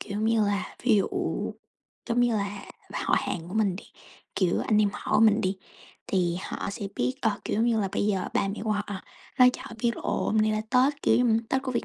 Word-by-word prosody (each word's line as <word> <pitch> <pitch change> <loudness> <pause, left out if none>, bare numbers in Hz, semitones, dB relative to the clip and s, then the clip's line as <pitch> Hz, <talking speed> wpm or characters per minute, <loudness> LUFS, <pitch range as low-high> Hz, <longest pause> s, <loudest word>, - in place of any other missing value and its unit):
kiểu 205 +1 -4
như 220 0 +3
là, 200 -2 -2
ví 235 -4 +4
dụ, 200 - +2 1.0
giống 235 +1 +2
như 240 -1 +3
là, 200 0 -3 0.3
họ - - +1
hàng 170 -2 -4
của 190 - -7
mình 200 -4 +1
đi, - - -10 0.5
kiểu, 180 -3 +1
anh 215 - +2
em 205 - +3
họ - - 0
mình 220 0 +5
đi, 190 +1 -1 0.5
thì 175 -3 +1
họ - - -4
sẽ 200 0 -5
biết, 255 - 0
ờ, 215 -2 0
kiểu, - - -1
giống 225 - +2
như 230 -2 +2
là, 195 - 0
bây 205 - 0
giờ 195 -3 0
ba 195 - +1
mẹ 200 - -4
của 215 - -1
họ 205 0 -1 0.5
nói 250 0 +8
cho - - -7
họ - - -9
biết 235 0 +1
là - - -8
ồ, - - -1
hôm 220 - 0
nay 215 0 +3
là 215 - 0
Tết, 270 +3 +3
kiểu - - +4
như, 225 0 +3
Tết 265 0 0
của 260 - -3
Việt - - -1
215 Hz, 250 wpm, -27 LUFS, 200-230 Hz, 1.0 s, nói